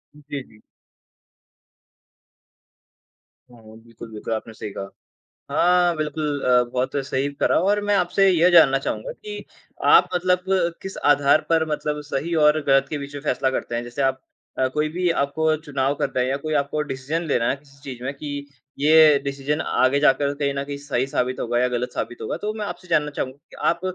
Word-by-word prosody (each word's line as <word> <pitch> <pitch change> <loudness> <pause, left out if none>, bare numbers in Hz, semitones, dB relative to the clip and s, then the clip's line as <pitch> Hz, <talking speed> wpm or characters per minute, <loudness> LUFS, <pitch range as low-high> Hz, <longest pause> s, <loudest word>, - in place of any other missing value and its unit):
जी, 145 -1 -7
जी। 110 -3 -21 2.9
हुँ, 110 -2 -15
बिल्कुल, 115 0 -12
बिल्कुल, 110 +1 -5
आपने 110 +1 -5
सही 110 -1 -7
कहा। 100 0 -5 0.6
हाँ, 175 -1 +3
बिल्कुल 150 -1 -2
अ, 125 -1 +5
बहुत 130 +3 -1
सही 140 +1 -1
करा - - +3
और 205 +3 +2
मैं 205 - +2
आपसे 195 +2 +3
यह 175 0 +4
जानना 140 -6 +6
चाहूँगा - - -4
कि 420 -3 -9 0.4
आप - - +6
मतलब 180 0 +2 0.4
किस 190 - -7 0.2
आधार 145 +1 +3
पर 165 -1 +3
मतलब 150 0 -2
सही 145 +4 -3
और 150 +1 +4
गलत 135 -1 +4
के 150 - -2
बीच 140 0 -8
में 145 - -6
फ़ैसला 130 -2 0
करते 125 -2 -4
हैं? 120 - -1
जैसे 120 +4 -4
आप 135 0 0 0.4
अ, 130 - +3
कोई 150 0 +1
भी 175 +3 -1
आपको 155 +1 +1
चुनाव 140 -2 -1
करना 135 -2 0
है 125 - +1
या 135 - 0
कोई 155 0 -2
आपको 145 +1 0
डिसीज़न 135 +6 -3
लेना 120 -4 +1
है, 135 - -1
किसी 140 0 -22
चीज़ 125 -3 -8
में 135 +2 -3
कि 145 0 -6 0.3
ये 155 0 +6
डिसीज़न 140 +2 -2
आगे 130 0 +2
जाकर 140 0 +3
कहीं 140 -1 -1
न 140 0 -2
कहीं 140 0 -6
सही 135 -3 -2
साबित 130 -1 -2
होगा 120 0 0
या 125 - +2
गलत 125 0 -3
साबित 120 - -4
होगा, - - -3
तो 210 +1 -3
मैं 215 -1 -4
आपसे 185 - -8
जानना 150 -3 +1
चाहूँगा 130 -2 -5
कि - - -14
आप 170 - +1
140 Hz, 190 wpm, -23 LUFS, 130-155 Hz, 2.9 s, जानना